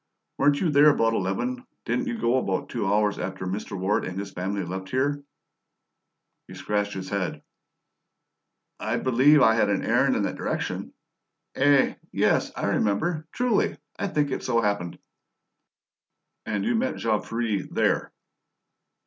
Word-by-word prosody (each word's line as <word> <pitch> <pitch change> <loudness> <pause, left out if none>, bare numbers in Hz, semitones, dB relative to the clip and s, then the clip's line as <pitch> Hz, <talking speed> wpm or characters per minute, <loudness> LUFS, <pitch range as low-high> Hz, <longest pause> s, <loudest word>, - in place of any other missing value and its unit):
"Weren't 145 0 +4
you 170 - +1
there 145 +1 +7
about 115 -5 +2
eleven? 180 - -2 0.2
Didn't 260 +1 -1
you 240 -2 -2
go 125 - +2
about 95 -7 -1
two 105 - -2
hours 105 0 +1
after 95 0 -4
Mr. 100 +1 -4
Ward 95 +3 0
and 90 +1 -5
his 100 0 -5
friends 95 0 -3
left 95 +1 -5
here?" 145 +4 0 1.2
He - - -10
scratched 105 -1 -1
his 95 -1 -5
head. 100 -3 -2 1.4
"I - - -1
believe 130 +3 +5
I 110 - +6
had 110 -2 +2
an 100 - 0
errand - - +3
in - - 0
that - - -2
direction. - - -3 0.6
Eh? 140 0 +4 0.2
Yes, - - +2
I - - -2
remember. 155 - 0
Truly, 245 -4 +1 0.2
I 200 - 0
think 150 -6 0
it - - -2
so 120 -2 +1
happened." 100 -5 -1 1.5
"And 105 -2 -1
you 225 - +2
found 260 +2 -1
Jean 110 -2 0
Ferret 115 -4 -2
there?" - - +1
110 Hz, 150 wpm, -25 LUFS, 100-145 Hz, 1.5 s, there